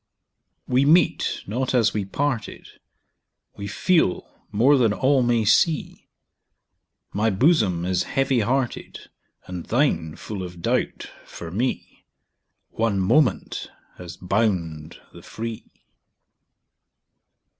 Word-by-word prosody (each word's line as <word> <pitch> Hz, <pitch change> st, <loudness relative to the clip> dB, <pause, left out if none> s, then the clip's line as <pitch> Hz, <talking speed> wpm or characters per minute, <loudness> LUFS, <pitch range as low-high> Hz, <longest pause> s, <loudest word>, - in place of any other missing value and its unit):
We 130 Hz, +2 st, +3 dB
meet 160 Hz, +3 st, +2 dB
not 130 Hz, +5 st, -2 dB
as 115 Hz, -5 st, +3 dB
we 105 Hz, -2 st, -2 dB
parted, 120 Hz, +3 st, -3 dB, 0.9 s
We 100 Hz, -, -6 dB
feel 160 Hz, -, +1 dB, 0.2 s
more 125 Hz, +8 st, +4 dB
than 115 Hz, -6 st, +3 dB
all 135 Hz, +3 st, +2 dB
may 120 Hz, -2 st, +1 dB
see; 150 Hz, -, +1 dB, 1.1 s
My 110 Hz, +2 st, +1 dB
bosom 100 Hz, -, +2 dB
is 90 Hz, -1 st, 0 dB, 0.2 s
heavy 135 Hz, -2 st, +2 dB
hearted, 125 Hz, +3 st, -2 dB, 0.3 s
And 90 Hz, -2 st, -7 dB
thine 85 Hz, -, 0 dB
full 105 Hz, -3 st, -7 dB
of 90 Hz, -1 st, -8 dB
doubt -, -, -2 dB
for 85 Hz, -1 st, -9 dB
me: 120 Hz, +8 st, -4 dB, 0.6 s
One 110 Hz, -3 st, 0 dB
moment 115 Hz, +4 st, +1 dB, 0.3 s
has 90 Hz, -1 st, -9 dB
bound 90 Hz, -6 st, -2 dB
the -, -, -12 dB
free. 115 Hz, 0 st, -7 dB
110 Hz, 105 wpm, -23 LUFS, 95-130 Hz, 1.1 s, more